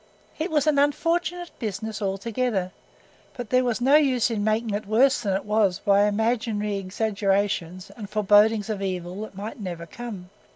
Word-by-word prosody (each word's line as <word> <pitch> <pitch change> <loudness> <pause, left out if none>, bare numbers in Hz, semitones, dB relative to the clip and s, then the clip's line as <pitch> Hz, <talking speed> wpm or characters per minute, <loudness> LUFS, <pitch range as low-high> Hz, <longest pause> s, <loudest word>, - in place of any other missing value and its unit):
It 320 +4 -1
was 300 -3 +1
an 300 -2 +3
unfortunate 340 +4 0
business 215 0 -4
altogether, 200 0 -1 0.6
but 245 -3 -7
there 255 0 +4
was 240 -2 -1
no 270 +4 +5
use 255 -5 +2
in 210 -2 -1
making 220 +1 0
it 205 0 -3
worse 245 +5 +3
than 200 -4 0
it 195 - -3
was 210 -4 +2
by 200 +1 +3
imaginary 215 -1 0
exaggerations 195 -2 -1
and 210 -4 -8
forebodings 210 +1 +4
of 205 -2 -4
evil 185 0 -4
that 215 -2 -8
might 215 +6 -6
never 175 -4 -6
come. 195 -1 -8
215 Hz, 165 wpm, -25 LUFS, 195-245 Hz, 0.6 s, no